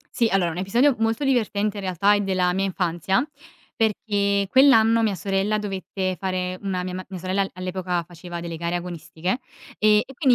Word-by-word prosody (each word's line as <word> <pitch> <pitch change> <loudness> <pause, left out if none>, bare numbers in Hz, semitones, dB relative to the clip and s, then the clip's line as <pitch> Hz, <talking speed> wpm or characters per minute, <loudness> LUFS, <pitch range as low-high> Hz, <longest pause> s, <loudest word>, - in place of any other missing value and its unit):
Sì, 235 - +3
allora 180 -3 +2
un 160 - -7
episodio 235 +9 +3
molto 225 +4 0
divertente 215 -6 0
in 200 - -5
realtà 190 +2 +2
è 205 - +2
della 185 -2 +1
mia 195 +1 0
infanzia, 185 - 0 0.5
perché 205 -3 +1
quell'anno 230 -4 +6
mia 215 -3 +1
sorella 195 +3 0
dovette 190 -2 -3
fare 185 -1 -2
una 190 -3 -2
mia 180 0 -5
ma 185 +1 -5
mia 190 -2 -6
sorella 190 +2 0
all'epoca 185 -1 -3
faceva 175 +1 -8
delle 170 -1 -5
gare 170 +1 -2
agonistiche, 175 +3 -3 0.4
e 210 0 +5
e 270 - -12
quindi 260 -1 +3
195 Hz, 180 wpm, -23 LUFS, 180-215 Hz, 0.5 s, quell'anno